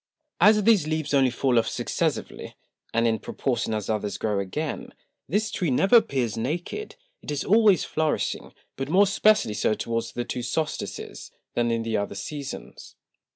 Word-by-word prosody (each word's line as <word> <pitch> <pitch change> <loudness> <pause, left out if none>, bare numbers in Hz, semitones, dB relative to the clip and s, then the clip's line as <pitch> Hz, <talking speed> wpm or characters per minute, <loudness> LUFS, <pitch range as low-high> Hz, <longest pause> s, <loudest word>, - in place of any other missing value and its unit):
As 210 0 +6
these 205 -8 +4
Leaves 155 -2 -2
only 135 -2 +4
fall 125 0 +2
off 115 - -1
successively, - - -3 0.4
and 115 +1 +1
in 110 -1 +1
proportion 120 -3 -2
as 105 -2 -3
others 105 -2 -2
grow 105 -2 -1
again, 145 +11 -4 0.3
this 210 +6 0
Tree 175 - -1
never 195 - +5
appears 130 - 0
naked: 165 - -4 0.3
It - - -10
is 145 -1 -2
always 210 -4 +4
flourishing, 155 -1 -1 0.3
but 135 +1 -4
more 190 +5 +5
especially 205 - +3
so 105 +1 +1
towards 115 0 -3
the 120 - -3
two 125 - -4
Solstices, 150 +6 -4 0.2
than 120 0 +1
in 115 -1 0
the 115 -1 -1
other 100 0 -3
Seasons. 140 +8 -7
135 Hz, 160 wpm, -25 LUFS, 115-175 Hz, 0.4 s, As